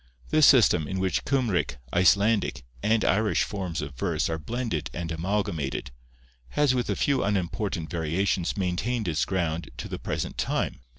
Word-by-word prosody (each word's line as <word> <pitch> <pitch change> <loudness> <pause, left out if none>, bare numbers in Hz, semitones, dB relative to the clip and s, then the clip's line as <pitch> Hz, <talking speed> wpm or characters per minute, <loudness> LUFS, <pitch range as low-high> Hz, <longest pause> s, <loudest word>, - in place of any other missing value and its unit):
This 155 -2 +6
system, 90 - +5
in 95 +2 -3
which 95 -3 0
Cymric, 120 - 0 0.2
Icelandic, 100 - +3 0.2
and 110 +1 +2
Irish 105 +2 +2
forms 90 -7 -3
of 70 -1 -6
verse 65 - -1
are 80 - -2
blended 115 - -3
and 85 0 -4
amalgamated, 80 -7 -2 0.7
has 145 -3 +4
with 125 -1 -1
a - - +1
few 140 -2 +1
unimportant 95 -3 -2
variations 85 +2 0
maintained 100 +5 -1
its 80 -3 +1
ground 85 -3 -2
to 65 - -5
the - - -5
present - - -4
time. - - -1
95 Hz, 155 wpm, -26 LUFS, 80-110 Hz, 0.7 s, This